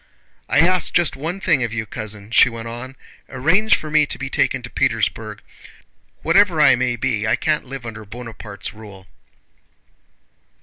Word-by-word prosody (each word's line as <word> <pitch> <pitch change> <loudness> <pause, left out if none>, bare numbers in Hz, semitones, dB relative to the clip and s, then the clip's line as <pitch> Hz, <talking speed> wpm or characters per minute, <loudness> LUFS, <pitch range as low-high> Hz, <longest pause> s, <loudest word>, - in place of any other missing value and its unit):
I 145 - +4
ask 185 +2 +3
just 175 -2 +2
one 165 +7 -4
thing 165 -8 +2
of 120 - -2
you, 110 -1 -3
cousin," 110 -1 -6
she 130 - +6
went 115 -1 -7
on, 120 +3 -8 0.3
"arrange 165 +12 +3
for 155 - -7
me 155 -1 +4
to - - -3
be 135 0 -5
taken 130 -2 0
to 125 - -7
Petersburg. 110 -4 -1 0.8
Whatever 170 0 +4
I 150 - +7
may 125 0 0
be, 110 -1 -1
I 110 - +3
can't 155 -1 -1
live 135 -1 -8
under 110 -2 -7
Bonaparte's 105 -2 -8
rule." 105 -3 -13
125 Hz, 165 wpm, -20 LUFS, 110-150 Hz, 0.8 s, I